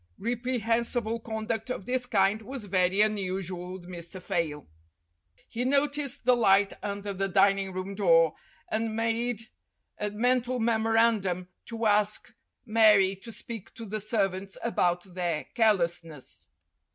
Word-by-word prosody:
Repre 245 +3 -1
hensible 230 0 0
conduct 220 +1 -4
of 225 -6 -4
this 250 0 -1
kind 200 0 +2
was 250 0 -7
very 185 0 +2
unusual 185 -4 -1
with 180 -2 -10
Mr. 175 +1 -6
Fayle. 165 -6 -2 0.8
He 240 +1 -3
noticed 280 0 +1
the 250 0 +5
light 200 -3 +4
under 200 0 -4
the 195 +1 -1
dining 195 0 +3
room 185 +1 -5
door, 165 -5 +4 0.3
and 220 0 -1
made 230 0 0 0.6
a 210 - -1
mental 245 +3 +1
memorandum 225 -5 +2 0.2
to 230 -1 -3
ask 210 0 +2 0.3
Mary 215 -4 +5
to 230 +4 -9
speak 225 -2 -8
to 230 - -8
the 215 +1 -3
servants 195 -3 -1
about 175 -6 +1
their 175 -4 -1
carelessness. 170 - 0
210 Hz, 130 wpm, -28 LUFS, 190-230 Hz, 0.8 s, the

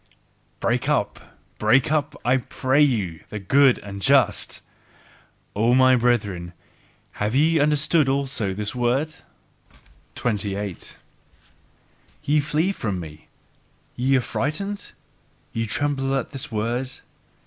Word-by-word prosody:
BREAK - - 0
UP, - - 0 0.4
BREAK 125 +7 +3
UP, 150 -1 0
I 125 +2 +4
PRAY 130 +2 0
YOU, 105 - +1
THE 105 - -5
GOOD 130 +7 +4
AND 100 -1 -8
JUST! - - +2 0.9
O 115 +4 +3
my 130 0 +6
brethren, 105 -8 0 0.7
have 105 +3 0
ye 160 +3 +4
understood 150 0 +3
also 135 -7 -1
this 105 +1 -3
word? 130 +5 0 1.0
28. 100 -4 -3 1.3
Ye 150 +1 +3
flee 155 +5 +1
from 105 - -3
me? 80 -2 -10 0.7
Ye 130 +2 +2
are - - +1
frightened? 195 - -3 0.6
Ye 115 0 -2
tremble 135 +3 0
at 135 - -2
this 135 -5 -5
word? 120 +4 -1
125 Hz, 115 wpm, -23 LUFS, 105-145 Hz, 1.3 s, my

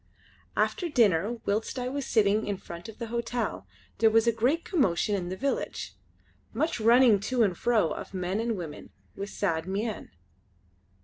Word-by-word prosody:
After 350 - +1
dinner 220 - +3
whilst 215 +5 -1
I 250 0 -2
was 275 +1 -3
sitting 215 -1 +2
in 200 -1 -1
front 170 +4 -9
of 220 - -11
the 235 -2 -6
hotel, 235 - -2 0.3
there 225 +1 +6
was 225 +1 +4
a 235 - +4
great 250 +9 0
commotion 210 - +1
in 180 -3 -2
the 185 - -3
village; 275 +4 -2 0.6
much 315 -5 -1
running 230 -1 +6
to 240 +4 +1
and 190 -4 +1
fro 215 -6 +2
of - - -6
men 185 +1 -2
and 230 -1 -1
women 160 -4 -7 0.3
with 200 +1 -5
sad 165 -6 -1
mien. 205 +3 -3
220 Hz, 170 wpm, -28 LUFS, 195-240 Hz, 0.6 s, there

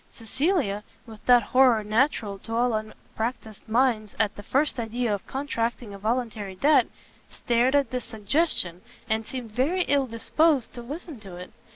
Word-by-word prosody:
Cecilia, 235 - -1 0.2
with 220 -3 -13
that 245 -2 +7
horror 250 -1 +4
natural 215 -2 0
to 225 +3 -5
all 240 0 +2
unpractised 220 0 -5
minds 225 -3 +1
at 215 -2 +1
the - - -8
first 275 +5 +1
idea 230 0 -1
of 200 - -5
contracting 235 -5 -3
a 200 - -9
voluntary 215 -3 -2
debt, 290 +10 +4 0.4
started 245 +3 +1
at 280 -4 +2
this 250 -1 -3
suggestion, 220 - 0 0.3
and 220 -1 -1
seemed 245 -4 -6
very 295 - +1
ill 280 -4 +1
disposed 270 +4 +1
to 240 - -7
listen 290 +2 -8
to 195 -4 -10
it. 180 +1 -9
235 Hz, 160 wpm, -26 LUFS, 215-265 Hz, 0.4 s, that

